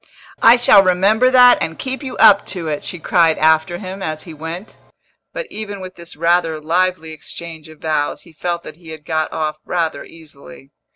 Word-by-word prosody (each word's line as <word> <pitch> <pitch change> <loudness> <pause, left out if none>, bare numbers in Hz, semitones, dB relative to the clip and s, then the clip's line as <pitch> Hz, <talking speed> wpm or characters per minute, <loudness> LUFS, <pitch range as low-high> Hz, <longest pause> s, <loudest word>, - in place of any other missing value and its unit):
"I 230 - +8
shall 240 -4 +6
remember 195 +7 +3
that 250 -1 +6
and 160 - -3
keep 265 +1 -5
you 265 -3 -7
up 200 0 +6
to 180 -4 -6
it!" 150 -1 -3
she 180 - -6
cried 165 -1 +2
after 160 +3 +2
him, 190 +1 -8
as 155 -3 -4
he 165 - -10
went. 165 +6 -8 0.6
But - - -5
even 205 -2 -6
with 185 -1 -9
this 170 -1 -11
rather 165 0 +1
lively 170 +1 -1
exchange 160 +1 -10
of 155 -1 -16
vows 155 -2 -2
he 170 - -18
felt 170 +2 -4
that 155 - -11
he 170 -2 -15
had 155 -2 -10
got 155 -1 -2
off 155 -1 -3
rather 165 -5 -2
easily. 155 -2 -15
170 Hz, 190 wpm, -18 LUFS, 155-190 Hz, 0.6 s, I